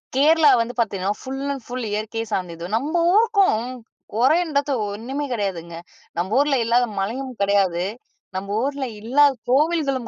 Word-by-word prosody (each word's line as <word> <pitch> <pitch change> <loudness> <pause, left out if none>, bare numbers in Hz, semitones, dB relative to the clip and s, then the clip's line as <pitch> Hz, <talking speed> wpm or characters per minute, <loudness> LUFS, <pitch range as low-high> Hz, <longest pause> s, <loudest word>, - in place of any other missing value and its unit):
கேரளா 305 +2 +5
வந்து 235 +1 -3
பார்த்தீங்கன்னா, 200 -4 0
full 270 +1 -5
and 270 -3 -8
full 245 -1 -4
இயற்கையை 220 +2 -3
சார்ந்தது. 170 -2 -3
நம்ம 280 +7 -2 0.2
ஊருக்கும் 400 - +3 0.5
குறைன்றது 285 +4 +2 0.2
ஒண்ணுமே 260 +8 -4
கிடையாதுங்க. 180 -6 -3 0.4
நம்ப 190 +7 0
ஊருல 285 0 +3
இல்லாத 240 +2 +3
மலையும் 255 +7 -3
கிடையாது, 195 -3 +2 0.5
நம்ம 200 +2 -3
ஊருல 280 0 -2 0.2
இல்லாத 280 +6 +4 0.2
கோவில்களும் 275 -3 +1
245 Hz, 130 wpm, -22 LUFS, 205-285 Hz, 0.5 s, கேரளா